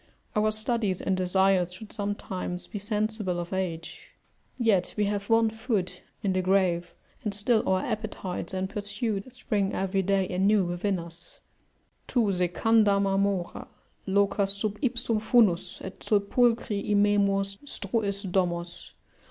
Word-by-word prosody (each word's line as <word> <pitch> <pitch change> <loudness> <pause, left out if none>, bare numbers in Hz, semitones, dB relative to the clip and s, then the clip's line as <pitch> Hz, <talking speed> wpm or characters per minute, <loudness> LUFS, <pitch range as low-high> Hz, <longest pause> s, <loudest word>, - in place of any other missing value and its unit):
Our 215 0 +3
studies 215 -3 0
and 190 - 0
desires 185 0 +2
should 205 +3 -10
sometime 200 -3 -3
be 205 - -4
sensible 210 -3 -1
of 175 +2 -5
age; 170 -3 -4 0.5
yet 220 -7 +2
we 210 - +2
have 200 0 -2
one 225 -1 +4
foot 215 -6 -2 0.2
in 195 -2 +1
the 185 - +1
grave 180 -2 +1 0.3
and 210 -2 -2
still 215 +2 +3
our 185 0 +2
appetites 205 -4 -4
and 190 0 -2
pursuits 210 +3 -4
spring 205 -5 -1
every 195 0 0
day 195 0 +1
anew 195 +3 +3
within 175 +3 -1
us: 170 0 -10 0.7
"Tu 230 -5 +2
secanda 200 +3 +3
marmora 195 -2 0 0.4
Locas 200 0 +1
sub 210 0 -2
ipsum 240 -4 0
funus, 205 -6 +3
et, 190 - -8
sepulcri 215 0 +1
Immemor, 205 -1 +3 0.2
struis 200 -3 -2
domos." 175 -2 -2
200 Hz, 130 wpm, -27 LUFS, 185-215 Hz, 0.7 s, one